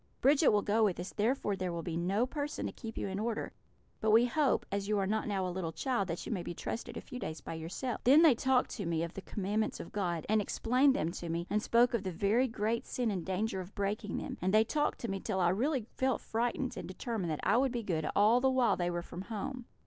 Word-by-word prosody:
Bridget 285 +2 +4
will 205 -1 +4
go 215 +2 +2
with 195 -5 +1
us, 180 - -5
therefore 215 -1 0
there 185 -2 -3
will 170 -1 -4
be 165 -1 -3
no 190 +7 +1
person 290 +2 -4
to - - -2
keep 225 -3 -8
you - - -2
in 190 +1 -3
order; 225 +1 -2 0.5
but 220 - 0
we 225 +3 +6
hope, 285 +3 +1
as 200 0 -2
you 210 0 +1
are 195 - +1
not 215 +3 -1
now 195 -3 0
a 180 - -3
little 175 -3 -3
child, 240 - -1
that 170 -1 -4
you - - -5
may 195 -5 -1
be 175 - -6
trusted 235 +5 -5
a - - -5
few 250 - -8
days 160 -8 -5
by - - -7
yourself.' 165 +10 -4
"Then 285 +6 +7
they 315 -5 +8
talked 255 +2 +2
to 200 -7 -4
me 165 -1 0
of 170 - -5
the 195 - -6
Commandments 205 +3 -2
of - - -8
God, 175 -6 -2
and 215 0 +3
explained 255 +6 +2
them 160 +2 0
to 170 -1 -6
me, 170 +1 -2
and 210 +1 +2
spoke 235 +3 +3
of 235 - +1
the 190 -1 -3
very 210 +9 +2
great 225 0 -2
sin 240 -3 -1
and 185 -4 -2
danger 190 +2 -1
of 185 +3 -11
breaking 200 0 -2
them; - - -5
and 185 +2 +1
they 215 +2 +6
talked 295 +6 0
to 235 - -2
me 195 -2 -2
till 190 -1 -2
I 175 -1 +4
really 250 - 0
felt 260 -1 +1
frightened, 240 +3 -2
and - - -5
determined 190 -1 -3
that 155 - -2
I - - +3
would 265 0 +2
be 240 -2 -3
good 160 -6 -1
all 220 +5 +5
the 265 - +4
while 260 -2 +3
they 175 -1 -1
were 175 0 -2
from 175 - -7
home. 240 +5 -5
210 Hz, 265 wpm, -32 LUFS, 185-240 Hz, 0.5 s, they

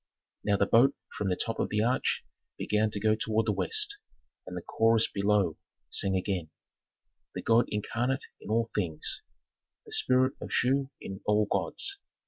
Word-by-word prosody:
Now 100 -1 +2
the 100 - +3
boat 125 +7 +5 0.2
from 100 -2 -1
the 90 - +1
top 115 +3 -3
of - - 0
the 105 0 +1
arch 125 +3 +1 0.3
began 105 +1 +1
to 105 - -4
go 110 +1 +3
toward 110 0 0
the - - +2
west, 420 -2 +1 0.5
and - - -6
the - - -5
chorus 115 0 +3
below 100 -4 +1 0.3
sang 95 -1 +1
again: 95 -3 -1 0.9
"The - - -4
god 115 +1 +4
incarnate 120 +5 -1
in - - -11
all 115 +1 +1
things, 85 -7 -2 0.6
the - - -14
spirit 130 +1 +3
of - - -6
Shu 135 +1 +2
in 95 0 -7
all 105 0 +3
gods. 395 - -1
110 Hz, 165 wpm, -29 LUFS, 100-125 Hz, 0.9 s, boat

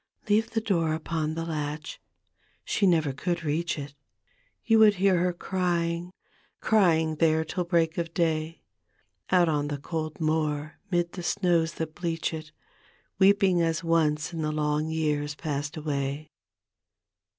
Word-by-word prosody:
Leave 215 +2 +2
the 225 - -1
door 170 -8 +1
upon 160 -1 -2
the 165 0 -3
latch 155 -1 -4 0.3
— - - -40
she 200 - +2
could - - +6
never 160 -5 +2 0.3
reach 160 +3 -1
it 140 -1 -7 0.4
— - - -40
You 225 -2 +4
would 215 -2 +7
hear 190 -1 +3
her 180 +1 +2
crying, 175 -1 -1 0.5
crying 160 -7 +3
there 160 0 +3
till 180 +2 -3
break 170 0 +1
of 165 -1 -3
day. 165 -1 -1 0.7
Out 180 -2 +4
on 145 -2 0
the 145 -1 -3
cold 155 +1 -5
moor 155 -1 -1
'mid 175 -2 0
the 180 - -7
snows 170 -2 +1
that 160 -1 -4
bleach 165 -2 -2
it, 155 -1 -7 0.7
Weeping 195 -2 +4
as 165 +1 0
once 160 -1 +1
in 165 - -3
the 155 0 -1
long 150 0 0
years 150 -2 -1
past 145 +1 -4
away. 145 0 -3
160 Hz, 150 wpm, -27 LUFS, 155-175 Hz, 0.7 s, would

